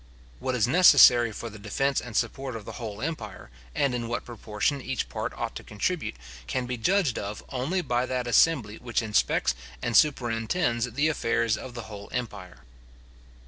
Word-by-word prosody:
What 130 Hz, -, -2 dB
is 115 Hz, -2 st, +2 dB
necessary 125 Hz, -7 st, +7 dB
for 115 Hz, +2 st, -7 dB
the 105 Hz, -, -11 dB
defence 135 Hz, +7 st, 0 dB
and 120 Hz, -3 st, -5 dB
support 130 Hz, +2 st, -2 dB
of 110 Hz, -2 st, -7 dB
the -, -, -6 dB
whole 110 Hz, -1 st, -5 dB
empire, 160 Hz, -, -5 dB, 0.2 s
and 140 Hz, -3 st, +1 dB
in 120 Hz, -1 st, -2 dB
what 120 Hz, -, -3 dB
proportion 120 Hz, +4 st, -2 dB
each 130 Hz, -1 st, -3 dB
part -, -, -3 dB
ought -, -, -4 dB
to -, -, -9 dB
contribute, 130 Hz, -, -2 dB, 0.3 s
can 125 Hz, -, -1 dB
be 125 Hz, 0 st, -3 dB
judged 165 Hz, -, +1 dB
of 100 Hz, +1 st, -6 dB
only 135 Hz, +9 st, -1 dB
by 125 Hz, -3 st, 0 dB
that 125 Hz, -1 st, -2 dB
assembly 120 Hz, -3 st, +3 dB
which 120 Hz, -1 st, -1 dB
inspects 105 Hz, -, +2 dB, 0.3 s
and 120 Hz, -, -2 dB
super 130 Hz, -5 st, +4 dB
intends 120 Hz, 0 st, 0 dB
the 145 Hz, +7 st, +1 dB
affairs 115 Hz, -6 st, +1 dB
of 125 Hz, -2 st, -8 dB
the 120 Hz, -, -5 dB
whole 105 Hz, -2 st, -10 dB
empire. 105 Hz, -7 st, -6 dB
120 Hz, 180 wpm, -27 LUFS, 110-135 Hz, 0.3 s, necessary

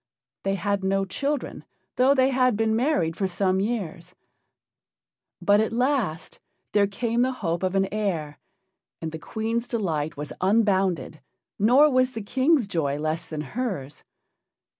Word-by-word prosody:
They 195 Hz, 0 st, 0 dB
had 200 Hz, +1 st, -1 dB
no 195 Hz, 0 st, +1 dB
children, 280 Hz, +9 st, -3 dB, 0.3 s
though 265 Hz, +3 st, +4 dB
they 260 Hz, 0 st, +3 dB
had 255 Hz, -4 st, +2 dB
been 220 Hz, 0 st, +1 dB
married 220 Hz, -, +1 dB
for 195 Hz, +2 st, 0 dB
some 185 Hz, 0 st, +1 dB
years; 185 Hz, -5 st, -3 dB, 1.2 s
but 205 Hz, 0 st, +4 dB
at 220 Hz, -, +1 dB
last 240 Hz, -, -1 dB, 0.3 s
there 205 Hz, -1 st, +3 dB
came 230 Hz, +4 st, -1 dB
the 255 Hz, +1 st, +2 dB
hope 170 Hz, -8 st, -2 dB
of 185 Hz, 0 st, -1 dB
an 195 Hz, 0 st, +2 dB
heir, 170 Hz, -8 st, -2 dB, 0.6 s
and 160 Hz, -1 st, -4 dB
the 160 Hz, -, -6 dB
Queen's 225 Hz, +6 st, -3 dB
delight 160 Hz, -, -2 dB
was 150 Hz, +1 st, -5 dB
unbounded 190 Hz, -5 st, +1 dB, 0.4 s
nor 250 Hz, +9 st, +6 dB
was 255 Hz, 0 st, +2 dB
the 225 Hz, -, -5 dB
King's 265 Hz, +4 st, +2 dB
joy 150 Hz, -7 st, -1 dB
less 155 Hz, +3 st, -2 dB
than 155 Hz, -2 st, -4 dB
hers. 155 Hz, -, -4 dB
200 Hz, 145 wpm, -25 LUFS, 170-240 Hz, 1.2 s, nor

